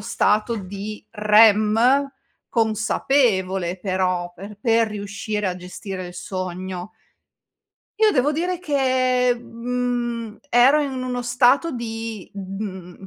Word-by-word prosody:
stato 215 +3 +1
di 205 +2 -7
REM, 220 +5 +4 0.4
consapevole 215 -5 +1
però 185 -2 -1
per 200 +3 -10
per 230 -1 +3
riuscire 210 0 -4
a 180 -1 -2
gestire 185 +1 -7
il - - -10
sogno 185 +1 -5 1.1
Io 435 -1 +5
devo 290 0 +2
dire 355 +3 -1
che, 255 -5 +2
mhmm, 240 -1 -3
ero 265 +5 +5
in 265 -3 -3
uno 250 -1 -3
stato 250 +6 +3
di, 225 -4 -5
mhmm, 190 -1 -7
220 Hz, 105 wpm, -22 LUFS, 195-250 Hz, 1.1 s, Io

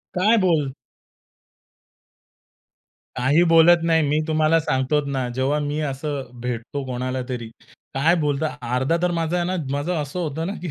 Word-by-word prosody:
काय 215 +6 +4
बोल 160 -8 +2 2.4
काही 135 +7 +3
बोलत 165 +1 +6
नाही. 165 -1 +3
मी 150 +2 +1
तुम्हाला 155 +1 +3
सांगतो 140 +1 0
ना, 135 -3 -2
जेव्हा 135 +3 +1
मी 145 +1 -2
असं 135 -1 -5
भेटतो 125 +3 -4
कोणालातरी, 125 -2 -4 0.4
काय 155 +6 +3
बोलता 150 0 0 0.3
अर्धा 130 +6 +1
तर 180 - +1
माझा 165 0 -1
आहे 175 - 0
ना, 185 - -1 0.2
माझं 145 +6 -1
असं 145 +5 -5
होतं 160 -1 -3
ना 195 - -3
की 175 - -4
150 Hz, 145 wpm, -22 LUFS, 130-165 Hz, 2.4 s, बोलत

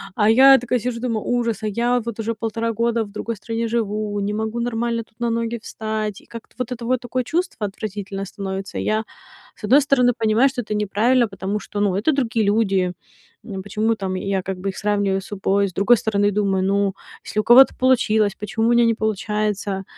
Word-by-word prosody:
а 210 -1 +2
я 270 +3 +8
такая 245 0 -1
сижу, 240 0 -3
думаю: 230 -4 -2
"Ужас, 235 -2 -1
а - - 0
я 240 +4 +1
вот 230 -1 -6
уже 225 +1 -1
1,5 225 +1 -2
года 230 +1 0
в 200 - -14
другой 225 +2 -4
стране 230 +2 -3
живу, 215 -2 -2
не 205 +1 -2
могу 220 +2 -3
нормально 235 -1 -1
тут 225 +1 -35
на 235 0 0
ноги 230 0 -2
встать". 215 -2 -4
И - - -22
как-то 230 -1 -11
вот 250 0 -4
это 240 -1 -5
вот 255 0 0
такое 250 +1 -2
чувство 320 - -2
отвратительное 195 -1 -6
становится. 195 0 -5
Я, 215 +1 0 0.5
с - - -21
одной 275 +7 +5
стороны, 250 -3 +3
понимаю, 225 +4 +3
что 255 -1 -4
это 210 -2 -5
неправильно, 220 +4 +2
потому 195 +1 -4
что, 205 - -6
ну, 200 -3 +1
это 210 +10 +2
другие 230 -5 0
люди. 195 -4 +1 0.5
М, 195 -4 -5
почему 215 +2 0
там 190 -2 -3
я 195 0 -1
как 190 -1 -4
бы 195 - -2
их 190 - -7
сравниваю 200 -2 0
с - - -12
собой? 200 0 0
С 185 - -16
другой 215 +5 +4
стороны, 205 -1 +1
думаю: 195 -2 0
"Ну, 200 0 +1 0.3
если 215 - -3
у 215 - +1
кого-то 255 +4 +7
получилось, 220 -5 +2
почему 215 +2 -1
у 235 - +3
меня 240 0 +5
не 230 -1 +2
получается?" 210 -2 -2
220 Hz, 210 wpm, -21 LUFS, 200-235 Hz, 0.5 s, я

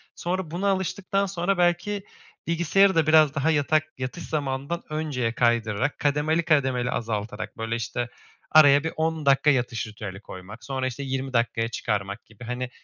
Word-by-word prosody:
sonra 175 -2 -3
buna 190 +4 -1
alıştıktan 195 +1 0
sonra 185 0 -1
belki 175 +3 +1 0.4
bilgisayarı 175 +3 +3
da 160 -1 +3
biraz 155 -2 +5
daha 155 +3 +2
yatak 155 +1 +2
yatış 130 +7 -5
zamanından 140 +2 -3
önceye 145 -7 -2
kaydırarak 120 0 +1
kademeli, 150 +3 +1
kademeli 130 -5 +2
azaltarak, 105 -2 -4
böyle, 115 +1 -2
işte, 120 +1 -3 0.4
araya 145 -2 +7
bir 160 - -3
10 160 -1 -1
dakika 140 +2 +4
yatış 120 -4 0
ritüeli 105 -2 -8
koymak 100 +5 -11
sonra, 130 +2 -2
işte, 130 +3 -5
20 135 0 -3
dakikaya 115 -1 +1
çıkarmak 105 -1 -3
gibi, 110 +2 -15
hani, 125 +1 -4
140 Hz, 155 wpm, -25 LUFS, 120-160 Hz, 0.4 s, araya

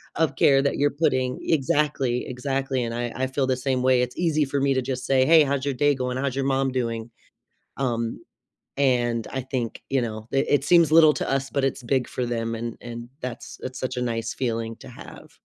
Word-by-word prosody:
of 155 -4 +1
care 135 -1 +5
that 140 - 0
you're 145 0 +2
putting 130 -4 0
Exactly, 145 -5 +1
exactly, 135 0 -2
and 115 0 -3
I, 120 0 -3
I 130 0 -1
feel 130 0 -1
the 130 - +2
same 130 -1 -1
way. 130 -1 +4
It's 125 0 -3
easy 160 -3 +2
for 140 +1 -2
me 135 0 +2
to 130 - +1
just 125 0 -4
say, 130 -1 +3
"Hey, 160 0 +7
how's 140 -1 -1
your 140 -1 -1
day 145 +2 +2
going? 125 0 -2
How's 135 -1 -1
your 135 - 0
mom 135 -1 +1
doing?" 115 -2 -2 0.7
um, 115 -3 -2 0.6
and 120 -4 +1
I 135 - -2
think, 125 -3 -4
you 135 -2 +1
know, 110 -1 -5
it 135 - +2
it 145 -1 +2
seems 170 -1 +5
little 155 -1 +7
to - - -3
us, 135 0 -1
but 140 - -1
it's 135 -1 -2
big 130 0 0
for 125 -1 -3
them, 115 -1 -2
and 115 0 -5
and 120 0 -8
that's 125 -2 -7
it's 130 0 -6
such 130 0 -3
a 125 - -1
nice 115 -1 -2
feeling 115 -2 -2
to - - -13
have. - - -12
130 Hz, 220 wpm, -24 LUFS, 120-140 Hz, 0.7 s, Hey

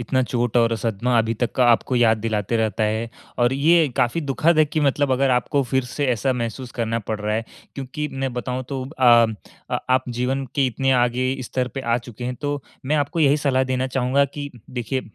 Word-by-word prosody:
इतना 130 +2 0
चोट 120 -1 -1
और 115 -1 +3
सदमा 115 +3 0
अभी 115 0 +1
तक 120 - 0
का 125 - +3
आपको 125 +2 +2
याद 115 -2 +4
दिलाते 110 0 -1
रहता 110 0 0
है 110 +2 -1 0.3
और 120 +1 +3
ये 160 +3 +4
काफ़ी 125 +8 +1
दुखद 155 +3 +1
है 155 - +7
कि 155 +1 -2
मतलब 140 -1 +2
अगर 135 +1 +2
आपको 130 +3 +1
फिर 130 -1 +2
से 140 +3 -2
ऐसा 125 +1 +1
महसूस 120 +1 -4
करना 115 0 0
पड़ 110 0 -4
रहा 105 +1 -1
है, 115 +1 -1 0.3
क्योंकि 145 +3 -4
मैं 135 -1 -3
बताऊँ, 125 +1 -3
तो 135 -2 -3 0.2
अ 130 - +3 0.6
अ, - - 0
आप 130 0 +3
जीवन 125 +3 -1
के 140 -2 +2
इतने 135 +2 0
आगे 125 +1 -1 0.2
स्तर 125 +1 -2
पे 135 - -6
आ 115 -2 +1
चुके 120 0 -9
हैं, 125 0 -2
तो 145 +1 -3 0.2
मैं 155 +2 +2
आपको 150 +4 -1
यही 145 0 +5
सलाह 135 -3 +1
देना 130 0 -1
चाहूँगा 130 +2 +1
कि 145 +1 -6 0.2
देखिए, 125 +1 -2
130 Hz, 215 wpm, -22 LUFS, 120-135 Hz, 0.6 s, है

